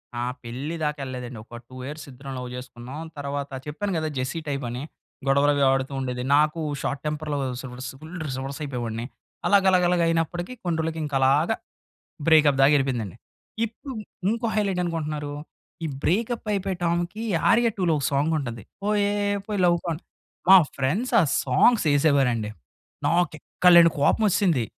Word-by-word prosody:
నా 120 - -2 0.2
పెళ్లి 130 +7 -5
దాకెళ్ళలేదండి. 130 -5 -4
ఒక 120 - -10
2 130 - -12
ఇయర్స్ 150 +1 -7
ఇద్దరం 135 +1 -8
లవ్ 125 -1 -5
చేసుకున్నాం. 125 +3 -8 0.2
తర్వాత 140 0 -3 0.2
చెప్పాను 195 +7 -3
కదా! 155 0 -1
జెస్సీ 130 +6 -2
టైపని 125 -3 -3 0.5
గొడవలవి 140 +1 +3
ఆడుతూ 135 +1 -1
ఉండేది. 125 -1 -3
నాకు 150 +2 +3 0.2
షార్ట్ 140 - -2
టెంపర్‌లో 150 -1 -2 0.3
సస్ 130 0 -7
ఫుల్ 160 +3 -9
రివర్స్ 135 +1 -4
అయిపోయేవాడిని. 120 -4 -4 0.4
అలా 200 - +6
గలాగలాగ 180 -2 +4
అయినప్పటికీ 165 +5 -1
కొన్ని 175 -3 0
రోజులకి 160 0 -2
ఇంకా 145 -2 -4
అలాగ 140 +7 +4 0.8
బ్రేకప్ 155 -4 +5
దాక 135 - +7
వెళ్ళిపోయిందండి. 125 -9 0 0.5
ఇప్పుడు 255 +4 -9 0.4
ఇంకో 230 +1 -1
హైలైట్ 200 -3 0
ఏంటనుకుంటున్నారు. 155 -4 -3 0.5
ఈ - - 0 0.2
బ్రేకప్ 230 +6 0
అయిపోయే 195 -2 -1
టామ్‌కి 175 +5 -1 0.3
ఆర్య 235 0 +4
2 190 - 0
లొ - - +4
ఒక 140 - -3
సాంగ్ 145 +4 +2
ఉంటది. 120 -6 -5 0.2
'పోయే 205 0 +1 0.3
పోయే 210 -2 -2
లవ్ 175 0 +4
గాన్' 165 -1 -2 0.5
మా 195 - +12 0.2
ఫ్రెండ్స్ 185 - 0
ఆ - - +4 0.2
సాంగ్స్ 195 - +4
వేసేవారండి. 135 -7 +2 0.6
నాకు 175 0 +2
ఎక్కలేని 170 0 +6
కోపం 180 - +3
వచ్చేసింది. 175 - +2
150 Hz, 150 wpm, -25 LUFS, 135-175 Hz, 0.8 s, మా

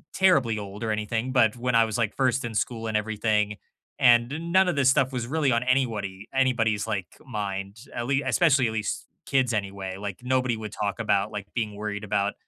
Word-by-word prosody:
terribly 140 - +3
old 100 +1 -7
or - - -2
anything, 110 +4 -2
but 115 -3 +4
when 125 0 0
I 115 - +6
was, 110 - -4
like, 110 -3 -1
first 130 0 +1
in 115 -2 -5
school 115 0 -2
and 110 -1 +1
everything, 105 -1 0 0.4
and 130 +8 +3
none 190 0 +5
of 175 - -1
this 135 -2 +4
stuff 135 -1 +2
was 125 -2 -3
really 150 -2 +1
on 115 +1 +2
anywody 110 -6 -1
anybody's, 115 -6 +2
like, 100 -5 -2 0.2
mind. 100 -3 -4 0.2
At 120 - -3
le 140 - +1
especially, 145 -8 +3
at 110 - -3
least, 110 -2 -3 0.2
kids 130 -3 +1
anyway. 95 -2 -3
Like, 100 -2 -6
nobody 130 -2 +1
would 105 -1 -6
talk 105 +1 -3
about, 105 -1 +1
like, 105 -1 -6
being 110 -3 -2
worried 105 0 -4
about 100 0 0
110 Hz, 200 wpm, -26 LUFS, 105-130 Hz, 0.4 s, I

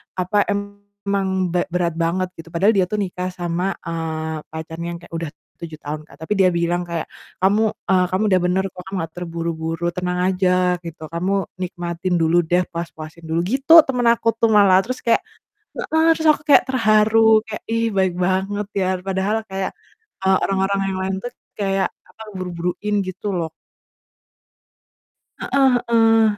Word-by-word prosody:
apa, 185 +3 +1
emang 200 -2 -2 0.2
berat 175 -2 0
banget," 185 +2 0
gitu. 165 - -10
Padahal 190 +5 +3
dia 185 - +4
tuh 210 -1 0
nikah 180 -1 -3
sama, 175 +2 -2
eee, 160 -1 -4
pacarnya 160 +1 -6
yang 170 - -7
kayak 175 - -16
udah 165 -2 -4 0.3
7 160 -2 -8
tahun 150 +1 -5
Kak, - - -18
tapi 210 - -1
dia 185 -1 +5
bilang 170 +1 0
kayak, 170 -2 -4 0.3
"Kamu, 205 +3 +3 0.3
e 190 - +4 0.2
kamu 195 +3 +1
udah 185 - +4
benar 185 +2 +1
kok, 180 0 -11
kamu 195 - -5
nggak 165 -1 -6
terburu-buru, 165 -1 -3
tenang 180 0 -2
aja," 180 -1 +2
gitu. 160 -1 -8
"Kamu 175 +4 -1 0.3
nikmatin 175 0 -3
dulu 165 +2 +4
deh, 175 +2 +2
puas-puasin 165 -1 -7
dulu," 160 +1 0
gitu, 270 - +2
teman 250 -2 -1
aku 230 0 0
tuh 230 -1 +3
malah. 195 -3 +6
Terus 255 +1 -4
kayak 230 -1 +3 0.6
heeh, 320 +1 +1
terus 320 - -1
aku - - -11
kayak 285 - +7
terharu, 220 -2 +4
kayak 215 - -6
"Ih 230 0 +1
baik 190 -2 +2
banget 190 +3 0
ya," 185 - +1 0.2
padahal 195 +2 -1
kayak, 190 0 -2 0.6
eee, 190 0 +5
orang-orang 195 0 0
yang 185 - -3
lain 190 0 -1
tuh 245 - -4 0.3
kayak, 195 -2 +1 0.2
apa, 220 - -13
buru-buruin 180 +3 -3
gitu 185 +3 -6
loh. 165 -2 -2 1.9
Heeh 270 -2 +2 0.2
heeh, 225 -1 +5
185 Hz, 160 wpm, -21 LUFS, 170-205 Hz, 1.9 s, kayak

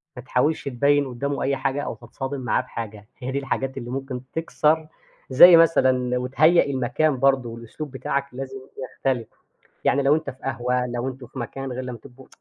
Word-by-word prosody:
ما 125 - -7
تحاولش 140 +5 0
تبيّن 140 +2 +2
قدّامه 140 +3 -3
أي 140 +1 +1
حاجة 135 +2 -1
أو - - -4
تتصادم 135 0 -6
معاه 120 -2 +1
بحاجة. 110 -4 -8
هي 130 0 -4
دي 140 - -1
الحاجات 135 -1 -3
اللي 120 -2 -6
ممكن 135 -1 -4
تكسر 160 -1 +1 0.4
زي 170 +6 +9
مثلًا 130 -6 +3
وتهيأ 155 +7 +4
المكان 140 +2 0
برضه، 135 -2 +2
والأسلوب 115 +6 -8
بتاعك 140 +1 -2
لازم 135 0 -6 0.2
يختلف، 125 -2 -2 0.6
يعني 140 +1 +3
لو 140 +2 +4
أنت 155 -3 -2
في 130 - -16
قهوة 125 -1 -1
لو 120 +1 -3
أنتم 130 -1 -8
في 130 - -11
مكان 135 +2 -5
غير 130 +1 -4
لمّا 125 -2 -6
تبقوا 130 +2 -15
135 Hz, 180 wpm, -23 LUFS, 125-140 Hz, 0.6 s, زي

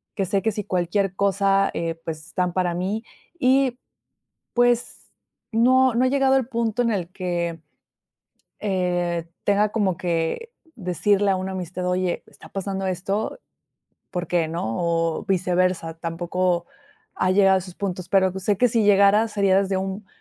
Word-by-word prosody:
que 195 - 0
sé 195 +2 0
que, 220 - +1
si 210 -1 -5
cualquier 190 +1 0
cosa, 195 0 +2
eh, 165 -1 -2
pues 155 -1 -6
están 180 0 -1
para 180 -1 0
mí 195 +5 -2 0.4
y, 260 -1 +3 0.8
pues 245 0 +2 0.5
no 255 +2 +4
no 245 +2 +3
ha - - +4
llegado 270 0 +3
el 260 -3 0
punto 235 -1 0
en 235 - +1
el 180 -5 -2
que, 175 -3 -3 1.0
eh, 175 -4 -1 0.2
tenga 205 +1 +3
como 200 -4 0
que 175 - -2 0.2
decirle 200 +1 +1
a - - +2
una 190 +1 -4
amistad. 180 0 -4
Oye, 180 0 -1
¿está - - -15
pasando 195 0 -3
esto? 195 - -2 0.7
Porque 175 -2 0
no, 115 -9 -3
o 165 -1 0
viceversa. 180 -3 +1
Tampoco 175 +1 -1 0.5
ha 185 - +1
llegado 195 0 +5
a - - +3
esos 180 -1 -10
puntos. 185 -3 -4
Pero, 190 -1 +4
pues, 190 0 -7
sé 205 0 +2
que 250 - +4
si 225 -1 +1
llegara, 200 +2 +5
sería 200 -3 +2
desde 195 -1 -1
un 195 +2 -4
190 Hz, 155 wpm, -23 LUFS, 175-210 Hz, 1.0 s, llegado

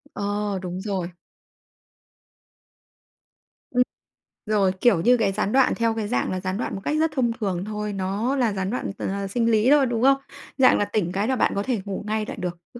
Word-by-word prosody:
Ờ, 205 -1 -2
đúng 180 0 -5
rồi. 185 -4 -2 2.6
Ừm. 250 0 +4 0.6
Rồi, 205 -3 +2
kiểu 210 -9 +4
như 245 +6 +5
cái 215 -4 +1
gián 205 +1 -1
đoạn 265 +1 +4
theo 230 -1 0
cái 220 -2 -2
dạng 230 - 0
là 185 - -2
gián 185 +1 -3
đoạn 235 - -3
một 195 - -6
cách 300 - 0
rất 320 0 +2
thông 240 -4 +2
thường 195 -6 -3
thôi, 210 0 -4
nó 200 +7 -1
là 235 -6 +1
gián 190 -1 -2
đoạn 245 -2 -3
t - - -11
h 195 0 -2
sinh 230 +3 +1
lý 220 +3 +3
thôi, 290 -2 +6
đúng 235 -2 -1
không? 275 0 +6 0.4
Dạng 260 -2 +6
là 205 - +1
tỉnh 185 -5 -1
cái 200 +4 -1
là 260 - +1
bạn - - +2
có 200 - 0
thể 235 -5 -1
ngủ 200 0 -4
ngay 215 0 -1
lại - - -7
được, 175 -1 -4 0.2
chứ 240 - -10
210 Hz, 215 wpm, -24 LUFS, 195-240 Hz, 2.6 s, thôi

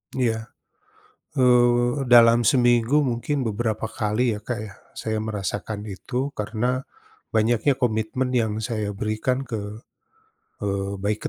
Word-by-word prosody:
Iya. 115 -3 0 0.9
Eee, 120 0 +3
dalam 120 -1 +6
seminggu 120 +3 +4
mungkin 135 +2 -1
beberapa 110 +1 -2
kali 110 +2 0
ya, - - -7
Kak, 120 -1 -3
ya 100 -3 -8 0.2
saya 110 -1 -3
merasakan 105 -1 -3
itu 125 +8 -3
karena 120 +5 -1 0.5
banyaknya 115 +5 +2
komitmen 120 +2 0
yang 110 -2 +1
saya 110 -2 -2
berikan 110 +6 -1
ke, 105 -3 -4 0.9
eee 100 -1 -2
baik 105 +1 -2
115 Hz, 115 wpm, -24 LUFS, 105-125 Hz, 0.9 s, dalam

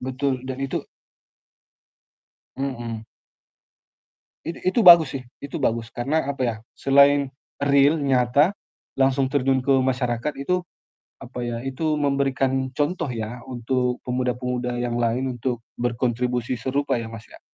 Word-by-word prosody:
Betul, 130 0 -2
dan 130 0 -5
itu 135 - -3 1.7
Mhm. 120 -5 -4 1.4
It 165 - -3 0.2
itu 235 - +1
bagus 170 -6 +9
sih 130 - -10 0.2
itu 140 - -5
bagus. 115 -4 -1
Karena 140 +7 0
apa 135 -2 -3
ya, 115 -2 -1 0.2
selain 140 +1 +5 0.3
real 140 +2 +4
nyata 140 +5 +3 0.4
langsung 135 0 +2
terjun 135 -1 +1
ke 135 - -1
masyarakat 125 +1 -1
itu, 180 +6 0 0.6
apa - - -8
ya, 120 -1 -3
itu 150 +4 -1
memberikan 135 -2 0
contoh 165 +4 0
ya 115 +1 -5
untuk 125 0 -1
pemuda-pemuda 125 0 -2
yang 120 -1 -2
lain 125 +2 0
untuk 120 -1 -2 0.2
berkontribusi 120 0 -1
serupa 140 +3 0
ya, 115 - -5
Mas, 115 -1 -10
ya. - - -15
130 Hz, 125 wpm, -23 LUFS, 120-140 Hz, 1.7 s, bagus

